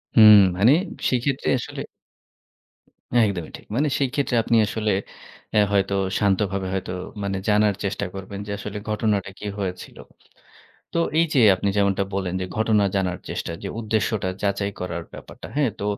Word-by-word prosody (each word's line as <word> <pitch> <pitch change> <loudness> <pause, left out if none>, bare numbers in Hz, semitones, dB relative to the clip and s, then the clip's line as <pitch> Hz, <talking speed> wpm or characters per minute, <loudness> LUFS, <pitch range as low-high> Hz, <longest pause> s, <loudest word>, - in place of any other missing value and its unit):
হুম 105 -2 +10 0.2
মানে 115 +8 +6 0.3
সেক্ষেত্রে 130 +2 0
আসলে - - -6 1.4
একদমই 90 -6 -3
ঠিক। - - -18
মানে 145 +4 +2
সেই 135 -3 +1
ক্ষেত্রে 140 -4 0
আপনি 115 - +1
আসলে 110 0 -1 0.6
এ - - +6
হয়তো 100 0 +2 0.3
শান্তভাবে 100 -1 +1
হয়তো 95 -1 -3 0.3
মানে 95 -1 -2
জানার 105 -1 +3
চেষ্টা 100 0 -2
করবেন 100 +1 -7
যে - - -4
আসলে 105 0 -6
ঘটনাটা 105 -2 0
কী - - -8
হয়েছিল। 90 -2 -5 1.0
তো 170 - 0 0.2
এই 170 - +4
যে 130 - +5
আপনি 100 +2 -2
যেমনটা 100 -1 +2
বলেন 95 -2 -2
যে - - -1
ঘটনা 110 -2 +3
জানার 90 -2 -1
চেষ্টা 85 - -4
যে 100 - -4
উদ্দেশ্যটা 110 -3 -1
যাচাই 100 0 0
করার 85 -2 -4
ব্যাপারটা। - - -11
হ্যাঁ, 140 -5 +2
তো - - -3
100 Hz, 155 wpm, -23 LUFS, 95-110 Hz, 1.4 s, হুম